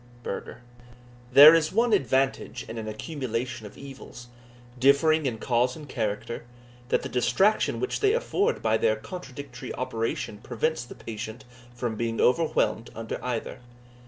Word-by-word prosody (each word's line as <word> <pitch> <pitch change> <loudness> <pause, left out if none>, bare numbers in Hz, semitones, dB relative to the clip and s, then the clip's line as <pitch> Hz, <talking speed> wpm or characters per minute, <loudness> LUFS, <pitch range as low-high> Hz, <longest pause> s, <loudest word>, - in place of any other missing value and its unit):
Burger. 115 +4 -6 0.7
There 145 +5 +11
is 160 -2 +2
one 230 +2 +2
advantage 130 - 0
in 115 - -6
an 110 - -6
accumulation 120 -1 -4
of - - -15
evils, 135 -3 -11 0.5
differing 140 +3 +4
in 115 -3 -2
cause 125 +2 +1
and 150 -2 -10
character, 110 -1 -3 0.5
that - - +1
the - - -3
distraction 195 - +2
which 390 - -2
they 410 0 +3
afford 470 -2 0
by - - +3
their 475 +2 +2
contradictory 140 -7 -8
operation 115 -3 -3
prevents 125 +6 -2
the - - -11
patient 110 +3 -7 0.3
from 120 -3 -3
being 115 0 -2
overwhelmed 125 -6 +2
under 115 0 -5
either. 125 -3 -3
125 Hz, 140 wpm, -26 LUFS, 115-155 Hz, 0.7 s, There